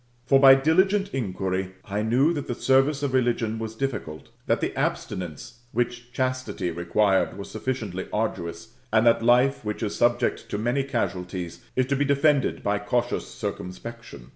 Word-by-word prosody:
For 135 Hz, +1 st, +5 dB
by 135 Hz, -1 st, +9 dB
diligent 190 Hz, +8 st, +2 dB
inquiry 95 Hz, -5 st, -2 dB
I 100 Hz, +1 st, -2 dB
knew 125 Hz, +9 st, +3 dB
that 145 Hz, -4 st, -4 dB
the 120 Hz, -, -2 dB
service 135 Hz, +3 st, +2 dB
of 140 Hz, -2 st, -1 dB
religion 120 Hz, -3 st, +1 dB
was 110 Hz, 0 st, -5 dB
difficult, 105 Hz, -, -4 dB, 0.2 s
that -, -, +2 dB
the -, -, -2 dB
abstinence 90 Hz, -, -3 dB
which 120 Hz, 0 st, -2 dB
chastity 130 Hz, -8 st, -2 dB
required 95 Hz, +5 st, +1 dB
was 100 Hz, -, -8 dB
sufficiently 110 Hz, -5 st, -3 dB
arduous, 105 Hz, -1 st, -3 dB, 0.2 s
and 110 Hz, +1 st, +4 dB
that 115 Hz, -1 st, +5 dB
life, 125 Hz, +3 st, +3 dB
which 105 Hz, +2 st, -4 dB
is 105 Hz, -, -2 dB
subject 120 Hz, 0 st, +1 dB
to -, -, -2 dB
many 120 Hz, +6 st, 0 dB
casualties, 90 Hz, -8 st, -3 dB, 0.2 s
is 130 Hz, -, +2 dB
to 140 Hz, +2 st, 0 dB
be 140 Hz, -, +1 dB
defended 140 Hz, 0 st, +2 dB
by 100 Hz, 0 st, +1 dB
cautious 120 Hz, +4 st, -1 dB
circumspection. 110 Hz, -, -7 dB
115 Hz, 160 wpm, -25 LUFS, 100-135 Hz, 0.2 s, by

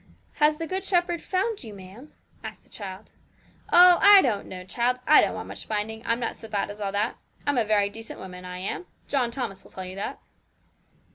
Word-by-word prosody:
'Has 300 Hz, 0 st, +4 dB
the 330 Hz, -, -3 dB
Good 375 Hz, +3 st, -3 dB
Shepherd 350 Hz, -2 st, +1 dB
found 400 Hz, +1 st, -1 dB
you, 215 Hz, -3 st, -9 dB
ma'am?' 195 Hz, +9 st, -12 dB, 0.3 s
asked -, -, -8 dB
the -, -, -28 dB
child. 195 Hz, 0 st, -9 dB, 0.6 s
'Oh, 355 Hz, 0 st, +8 dB
I 405 Hz, -1 st, +9 dB
don't 220 Hz, -6 st, -1 dB
know, 185 Hz, -1 st, -8 dB
child; 245 Hz, +5 st, 0 dB
I 305 Hz, -, +7 dB
don't -, -, 0 dB
want -, -, -6 dB
much -, -, -8 dB
finding. 220 Hz, +1 st, -3 dB
I'm 230 Hz, +1 st, +1 dB
not 230 Hz, -, -3 dB
so 225 Hz, -, -11 dB
bad 205 Hz, -1 st, -2 dB
as 210 Hz, +1 st, -11 dB
all 200 Hz, -1 st, -1 dB
that; 210 Hz, +3 st, -1 dB, 0.3 s
I'm 285 Hz, -3 st, +2 dB
a 225 Hz, -, +1 dB
very 210 Hz, -1 st, +3 dB
decent 225 Hz, +2 st, -9 dB
woman, 180 Hz, -1 st, -9 dB
I 180 Hz, 0 st, -7 dB
am. 195 Hz, -, -4 dB, 0.2 s
John 260 Hz, -4 st, +1 dB
Thomas 235 Hz, -6 st, -5 dB
will -, -, -17 dB
tell 185 Hz, -, -7 dB
you 185 Hz, +1 st, -8 dB
that.' 200 Hz, -, -4 dB
225 Hz, 215 wpm, -26 LUFS, 200-300 Hz, 0.6 s, I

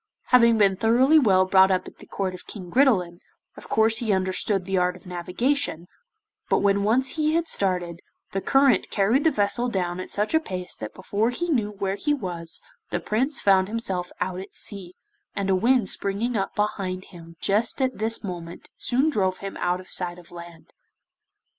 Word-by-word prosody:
Having 235 Hz, -2 st, +5 dB
been 200 Hz, -2 st, +4 dB
thoroughly 245 Hz, +9 st, +4 dB
well 190 Hz, -8 st, +4 dB
brought 190 Hz, 0 st, +5 dB
up 185 Hz, -1 st, 0 dB
at -, -, -12 dB
the -, -, -14 dB
court 190 Hz, -2 st, -3 dB
of 180 Hz, -, -9 dB
King 185 Hz, -5 st, -9 dB
Gridelin, 190 Hz, -11 st, +2 dB, 0.4 s
of -, -, -13 dB
course 220 Hz, 0 st, +3 dB
he 225 Hz, -3 st, -1 dB
understood 190 Hz, 0 st, +1 dB
the 195 Hz, 0 st, -2 dB
art 180 Hz, 0 st, +1 dB
of 180 Hz, -, -16 dB
navigation, 180 Hz, -, -2 dB, 0.6 s
but -, -, +3 dB
when 200 Hz, 0 st, +2 dB
once 250 Hz, +8 st, +1 dB
he 310 Hz, 0 st, +1 dB
had 335 Hz, 0 st, 0 dB
started, 180 Hz, -, -1 dB, 0.3 s
the 195 Hz, -, -2 dB
current 270 Hz, +3 st, +3 dB
carried 220 Hz, +8 st, +2 dB
the 320 Hz, -, +5 dB
vessel 215 Hz, 0 st, +1 dB
down 180 Hz, -4 st, -2 dB
at 185 Hz, -, -6 dB
such 210 Hz, +6 st, -1 dB
a 320 Hz, -, +5 dB
pace 185 Hz, -, -5 dB
that 110 Hz, -1 st, -7 dB
before 205 Hz, +4 st, -1 dB
he 345 Hz, +8 st, -3 dB
knew 225 Hz, -8 st, +1 dB
where 195 Hz, -2 st, -3 dB
he 295 Hz, +5 st, 0 dB
was 175 Hz, -, -5 dB, 0.3 s
the 175 Hz, -, -2 dB
Prince 250 Hz, -, -1 dB
found 190 Hz, -1 st, +3 dB
himself 195 Hz, -5 st, -3 dB
out 180 Hz, 0 st, -2 dB
at 195 Hz, +2 st, -10 dB
sea, 190 Hz, -4 st, -5 dB, 0.4 s
and 195 Hz, -1 st, -1 dB
a -, -, +4 dB
wind 235 Hz, +2 st, +2 dB
springing 205 Hz, +7 st, -2 dB
up 195 Hz, -2 st, -2 dB
behind 190 Hz, -3 st, -2 dB
him 165 Hz, -1 st, -12 dB
just 215 Hz, +7 st, +1 dB
at 260 Hz, -3 st, -1 dB
this 225 Hz, +2 st, -1 dB
moment 175 Hz, -3 st, -8 dB
soon 260 Hz, +5 st, +1 dB
drove 190 Hz, -7 st, 0 dB
him 195 Hz, -1 st, -7 dB
out 180 Hz, +1 st, 0 dB
of 185 Hz, -, -12 dB
sight 175 Hz, -1 st, -3 dB
of 175 Hz, -2 st, -16 dB
land. 170 Hz, -1 st, -12 dB
195 Hz, 190 wpm, -24 LUFS, 180-235 Hz, 0.6 s, Having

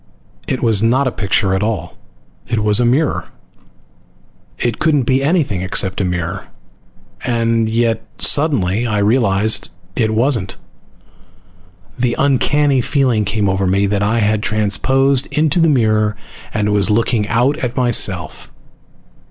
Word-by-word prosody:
It 130 Hz, -, -3 dB
was 110 Hz, -4 st, +3 dB
not 125 Hz, +5 st, +2 dB
a 130 Hz, -, 0 dB
picture 100 Hz, -2 st, 0 dB
at 95 Hz, -, 0 dB
all, 105 Hz, -5 st, -3 dB, 0.5 s
it 115 Hz, -3 st, -1 dB
was 105 Hz, +1 st, +3 dB
a 120 Hz, -, +2 dB
mirror! 140 Hz, +6 st, 0 dB, 1.3 s
It 120 Hz, -2 st, -2 dB
couldn't 150 Hz, -4 st, +2 dB
be 130 Hz, +2 st, +1 dB
anything 140 Hz, -, 0 dB
except 95 Hz, +1 st, -1 dB
a -, -, 0 dB
mirror. 90 Hz, +1 st, -3 dB, 0.8 s
And 115 Hz, -2 st, 0 dB
yet, 115 Hz, 0 st, 0 dB, 0.2 s
suddenly, 120 Hz, -, +1 dB
I 105 Hz, -2 st, -1 dB
realized 105 Hz, -1 st, +1 dB, 0.3 s
it 110 Hz, -2 st, 0 dB
wasn't. 115 Hz, -5 st, 0 dB, 1.4 s
The 120 Hz, -1 st, 0 dB
uncanny 140 Hz, 0 st, +2 dB
feeling 125 Hz, -5 st, 0 dB
came 105 Hz, 0 st, -1 dB
over 95 Hz, 0 st, 0 dB
me 100 Hz, +2 st, +1 dB
that 100 Hz, 0 st, -1 dB
I 105 Hz, +3 st, +1 dB
had 105 Hz, -1 st, +1 dB
transposed 130 Hz, +6 st, +1 dB
into 155 Hz, +2 st, 0 dB
the 165 Hz, -1 st, +3 dB
mirror 110 Hz, -5 st, +1 dB, 0.4 s
and 105 Hz, -1 st, -1 dB
was 100 Hz, 0 st, +2 dB
looking 110 Hz, 0 st, +1 dB
out 125 Hz, +6 st, +1 dB
at 125 Hz, -4 st, -4 dB
myself. 120 Hz, -3 st, 0 dB
115 Hz, 135 wpm, -16 LUFS, 105-130 Hz, 1.4 s, was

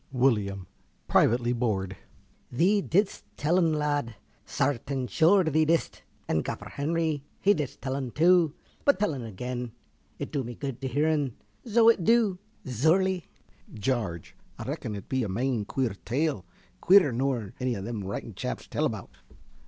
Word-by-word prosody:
~Willyum~ 105 Hz, -8 st, +1 dB, 0.4 s
(privately 120 Hz, +1 st, +3 dB
bored). 100 Hz, -6 st, -1 dB, 0.6 s
Thee 190 Hz, +11 st, +3 dB
didst 200 Hz, +2 st, +1 dB
tell 165 Hz, +5 st, +2 dB
'un, 165 Hz, -3 st, +3 dB
lad, 145 Hz, -6 st, -1 dB, 0.3 s
sartain 135 Hz, -1 st, -1 dB
sure 165 Hz, -, +4 dB
thee 160 Hz, -1 st, +2 dB
didst. 165 Hz, +2 st, 0 dB, 0.3 s
And 80 Hz, -, +1 dB
Gaffer -, -, -5 dB
Henry, 155 Hz, 0 st, -1 dB, 0.2 s
he 205 Hz, -, +4 dB
didst 150 Hz, -8 st, -4 dB
tell 130 Hz, 0 st, -2 dB
'un 135 Hz, -2 st, -3 dB
too. 165 Hz, +2 st, +4 dB, 0.3 s
But 285 Hz, -, +4 dB
tell 210 Hz, -6 st, +1 dB
'un 135 Hz, -, -5 dB
again. 120 Hz, +2 st, -5 dB, 0.4 s
It -, -, -5 dB
du 140 Hz, -3 st, -1 dB
me 120 Hz, 0 st, -7 dB
good 135 Hz, -1 st, -5 dB
to 135 Hz, -, -2 dB
hear 145 Hz, +5 st, +1 dB
'un, 145 Hz, -6 st, 0 dB, 0.3 s
zo 230 Hz, +1 st, +4 dB
it 225 Hz, -6 st, +5 dB
du. 220 Hz, -3 st, +3 dB, 0.3 s
Zure 155 Hz, -, +3 dB
lie. 190 Hz, -1 st, -1 dB, 0.5 s
~Jarge~. 105 Hz, -7 st, -2 dB, 0.2 s
A -, -, -6 dB
rackun 105 Hz, -, -4 dB
it 100 Hz, -, -10 dB
be 130 Hz, -1 st, 0 dB
a 110 Hz, -, -2 dB
main 115 Hz, +2 st, -1 dB
queer 125 Hz, +1 st, -1 dB
tale, 135 Hz, -, -1 dB, 0.4 s
queerer 185 Hz, -6 st, +6 dB
nor 120 Hz, -4 st, -1 dB
any 125 Hz, -2 st, 0 dB
them 105 Hz, +1 st, -4 dB
writing 95 Hz, +1 st, -5 dB
chaps -, -, -4 dB
tell -, -, -1 dB
about. -, -, -5 dB
135 Hz, 160 wpm, -28 LUFS, 120-165 Hz, 0.6 s, queerer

